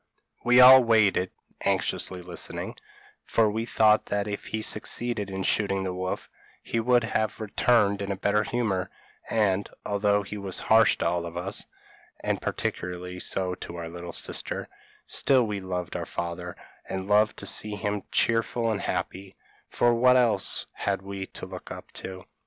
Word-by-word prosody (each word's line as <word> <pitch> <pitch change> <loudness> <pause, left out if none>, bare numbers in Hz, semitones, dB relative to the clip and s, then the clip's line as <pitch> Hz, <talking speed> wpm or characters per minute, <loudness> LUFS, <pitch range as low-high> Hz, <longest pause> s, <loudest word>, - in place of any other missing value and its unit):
We 125 +1 +5
all 130 +1 +10
waited 105 -5 +3 0.3
(anxiously 90 -1 0
listening), 90 0 -4 0.5
for 110 -2 +2
we 115 +2 -3
thought 110 -2 +4
that 105 0 -1
if 100 -1 -5
he 110 0 -3
succeeded 110 -1 -1
in 95 0 -4
shooting 100 -1 +1
the 95 -1 -3
wolf, 95 0 -4 0.4
he 115 - -2
would 120 +1 +3 0.4
return 105 -1 +2
in 100 0 -4
a - - -1
better 100 +2 +1
humour; 105 -6 -1 0.4
and, 100 -3 +1 0.2
although 100 0 +1
he 105 +1 -7
was 95 -2 -1
harsh 110 -3 +4
to - - -2
all 85 -1 0
of 85 +1 -8
us, 95 +3 -1 0.5
and - - -2
particularly 90 0 -4
so 90 0 -1
to 85 - -8
our 85 -1 -6
little 85 0 -7
sister, - - -2 0.4
still 130 -3 +3
we 105 -2 -3
loved 90 -2 -4
our - - -4
father, 85 0 -5 0.3
and 95 0 -4
loved 105 +1 +3
to - - -7
see 105 -1 +1
him 105 0 -2
cheerful 115 0 +1
and 105 - -2
happy, 95 0 -4 0.3
for 120 0 +3
what 125 +2 +5
else 120 -3 +2
had - - -2
we 100 -1 -6
to - - -8
look - - -9
up - - -9
to? 95 -1 -8
100 Hz, 165 wpm, -26 LUFS, 95-110 Hz, 0.5 s, all